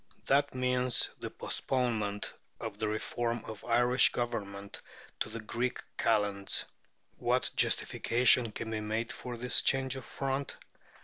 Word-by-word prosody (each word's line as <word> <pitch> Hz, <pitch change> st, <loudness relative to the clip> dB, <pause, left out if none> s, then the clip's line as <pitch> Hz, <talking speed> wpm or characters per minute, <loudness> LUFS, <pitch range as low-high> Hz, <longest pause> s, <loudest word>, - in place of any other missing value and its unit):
That 140 Hz, 0 st, +2 dB
means 125 Hz, -1 st, +1 dB
the -, -, -4 dB
postponement 110 Hz, -6 st, -2 dB, 0.3 s
of -, -, -6 dB
the 110 Hz, -, 0 dB
reform 115 Hz, +2 st, -2 dB
of 110 Hz, -2 st, -8 dB
Irish 120 Hz, +2 st, +4 dB
Government 100 Hz, -5 st, -4 dB, 0.4 s
to -, -, -1 dB
the 115 Hz, +1 st, -5 dB
Greek 120 Hz, +3 st, -2 dB, 0.2 s
Kalends. 100 Hz, -3 st, +1 dB, 0.5 s
What -, -, +1 dB
justification 120 Hz, -1 st, +4 dB
can 110 Hz, +1 st, -5 dB
be 110 Hz, -, -1 dB
made 110 Hz, +2 st, -2 dB
for 125 Hz, -1 st, -7 dB
this 125 Hz, +2 st, +3 dB
change 135 Hz, 0 st, +1 dB
of 130 Hz, -, -7 dB
front? 135 Hz, 0 st, -3 dB
120 Hz, 130 wpm, -31 LUFS, 110-125 Hz, 0.5 s, Irish